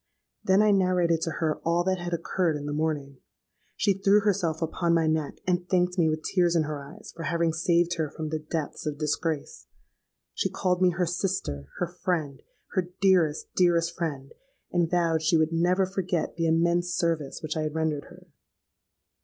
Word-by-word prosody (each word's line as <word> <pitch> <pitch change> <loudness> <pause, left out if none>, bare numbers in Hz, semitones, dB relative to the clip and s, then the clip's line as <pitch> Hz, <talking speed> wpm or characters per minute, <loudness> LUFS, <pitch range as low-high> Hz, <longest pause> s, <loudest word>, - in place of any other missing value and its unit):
Then 190 +2 +4
I 215 - +4
narrated 180 -4 +2
to 165 - -1
her 155 -2 0
all 170 +1 +2
that 185 0 0
had 175 0 -4
occurred 170 0 0
in 145 - -7
the 145 - -3
morning. 145 -3 -2 0.6
She 200 - +3
threw 195 +2 +3
herself 180 -6 0
upon 170 +1 0
my 165 -1 +2
neck, 155 -2 -1
and 180 -1 0
thanked 180 0 +1
me 160 -2 +4
with 155 0 -2
tears 175 -2 +2
in 165 - +3
her 150 -1 -4
eyes 140 +1 -11
for 165 - -8
having 165 +1 +1
saved 170 0 +1
her 155 -2 -1
from 155 0 -5
the 155 0 -2
depths 155 0 -4
of 150 -1 -2
disgrace. 155 0 -2 0.7
She - - -1
called 180 0 0
me 185 - +6
her 180 +1 0
'sister'—her 175 - -3 0.2
'friend'—her 175 +2 -3
'dearest, 175 -6 +2
dearest 170 -2 +2
friend;' 140 -5 -4 0.4
and 175 -2 +1
vowed 165 -2 +1
she 160 +1 +3
would 160 +1 +1
never 180 +3 +2
forget 185 -2 -2
the 165 0 0
immense 170 +2 +2
service 165 -6 -1
which 155 +1 -3
I 155 - -1
had 155 0 -3
rendered 155 -3 -1
her. - - -15
170 Hz, 180 wpm, -27 LUFS, 155-180 Hz, 0.7 s, me